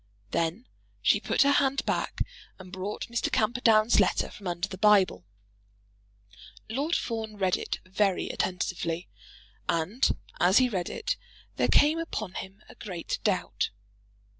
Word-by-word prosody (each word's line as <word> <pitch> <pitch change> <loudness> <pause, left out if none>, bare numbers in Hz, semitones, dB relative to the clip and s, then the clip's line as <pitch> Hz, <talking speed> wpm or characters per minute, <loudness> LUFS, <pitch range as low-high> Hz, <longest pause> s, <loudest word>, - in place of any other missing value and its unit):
Then 170 +9 -1 0.4
she - - +4
put - - +2
her 280 - +4
hand 275 -1 +2
back - - -1 0.4
and 185 -1 -12
brought 190 +2 -4
Mr. 235 0 -2
Camperdown's 225 0 +4
letter 195 - +2
from 195 - -9
under 175 +2 -1
the 190 -1 -8
Bible. 195 - +4 1.4
Lord 280 +9 -1
Fawn 220 -2 -3
read 190 -2 +2
it - - -3
very 195 0 +1
attentively, 180 -2 -2 0.6
and 175 +10 +1 0.2
as 185 +3 +5
he 255 -1 +5
read 185 -6 -2
it - - -2 0.4
there - - +2
came 305 +3 +4
upon 215 - -4
him 190 +3 -8
a - - -13
great 180 -6 -5
doubt. - - 0
205 Hz, 140 wpm, -28 LUFS, 185-235 Hz, 1.4 s, as